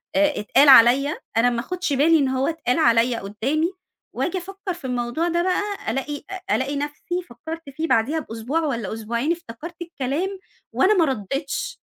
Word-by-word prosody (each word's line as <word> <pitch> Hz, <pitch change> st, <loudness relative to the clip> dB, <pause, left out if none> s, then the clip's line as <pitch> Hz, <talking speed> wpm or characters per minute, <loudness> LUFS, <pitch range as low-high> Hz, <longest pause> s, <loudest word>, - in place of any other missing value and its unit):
آآ، 295 Hz, 0 st, +3 dB
اتقال 275 Hz, +7 st, +4 dB
عليَّ 265 Hz, +4 st, +6 dB, 0.2 s
أنا 245 Hz, +2 st, +5 dB
ما 235 Hz, -, -2 dB
آخُدش 360 Hz, +3 st, -2 dB
بالي 315 Hz, +4 st, +4 dB
إن 275 Hz, -, +2 dB
هو 260 Hz, +1 st, 0 dB
اتقال 325 Hz, -5 st, 0 dB
عليَّ 235 Hz, -3 st, +4 dB
قدّامي 270 Hz, -, -1 dB, 0.4 s
وآجي 370 Hz, -, -1 dB
أفكّر 390 Hz, +1 st, -5 dB
في 340 Hz, -, -11 dB
الموضوع 245 Hz, +6 st, -1 dB
ده 345 Hz, 0 st, +1 dB
بقى 370 Hz, +2 st, +1 dB, 0.3 s
ألاقي 290 Hz, +2 st, -4 dB
أ 380 Hz, 0 st, -2 dB
ألاقي 270 Hz, +2 st, -1 dB
نَفْسي 295 Hz, +5 st, -3 dB
فكّرت 320 Hz, +5 st, -8 dB
فيه 315 Hz, +4 st, -3 dB
بعديها 270 Hz, +7 st, +2 dB
بأسبوع 240 Hz, +3 st, -3 dB
والَّا 235 Hz, -10 st, -2 dB
أسبوعين 235 Hz, +7 st, -2 dB
افتكرت 335 Hz, 0 st, -6 dB
الكلام، 340 Hz, +4 st, -3 dB, 0.3 s
وأنا 400 Hz, +3 st, +4 dB
ما 330 Hz, -, +5 dB
ردّيتش 270 Hz, -, -3 dB
285 Hz, 165 wpm, -23 LUFS, 245-335 Hz, 0.4 s, عليَّ